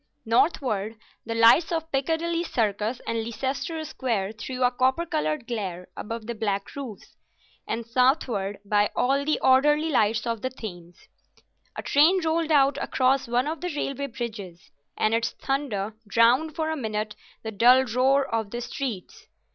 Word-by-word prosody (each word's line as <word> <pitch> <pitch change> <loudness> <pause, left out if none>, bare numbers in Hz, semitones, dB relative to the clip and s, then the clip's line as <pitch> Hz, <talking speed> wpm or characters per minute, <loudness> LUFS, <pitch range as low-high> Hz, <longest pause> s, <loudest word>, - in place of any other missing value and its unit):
Northward 225 - +1 0.3
the 230 - -2
lights 230 +10 +5
of 325 -1 -2
Piccadilly 330 +5 0
Circus 220 - -1
and 230 -1 -1
Leicester 265 +8 -3
Square 225 -9 -2
threw 255 +3 -4
a 250 - +4
copper 260 +6 +1
coloured 305 -5 -2
glare 190 -7 -5
above 230 0 -6
the 235 - -3
black 205 -3 -3
roofs, 260 -8 -8 0.5
and 230 0 -3
southward 240 -5 +1
by 205 0 +2
all 275 +3 +2
the 305 +1 0
orderly 295 +4 +4
lights 215 -3 +2
of 230 -2 -2
the 260 - -1
Thames. 175 -9 -10 0.7
A - - -5
train 320 +7 +4
rolled 320 0 0
out 280 -2 +4
across 265 0 +1
one 245 +2 +1
of 315 +2 -4
the 360 0 -3
railway 280 -1 -2
bridges, 215 -8 -7 0.3
and 215 - +1
its 230 0 0
thunder 235 -7 -2
drowned 240 +9 +3
for 315 -1 -1
a - - -1
minute 215 -5 -3 0.3
the 220 - -4
dull 245 +5 +6
roar 265 +3 +2
of 225 -4 -2
the 240 +3 -5
streets. 245 -5 -6
245 Hz, 155 wpm, -25 LUFS, 220-280 Hz, 0.7 s, dull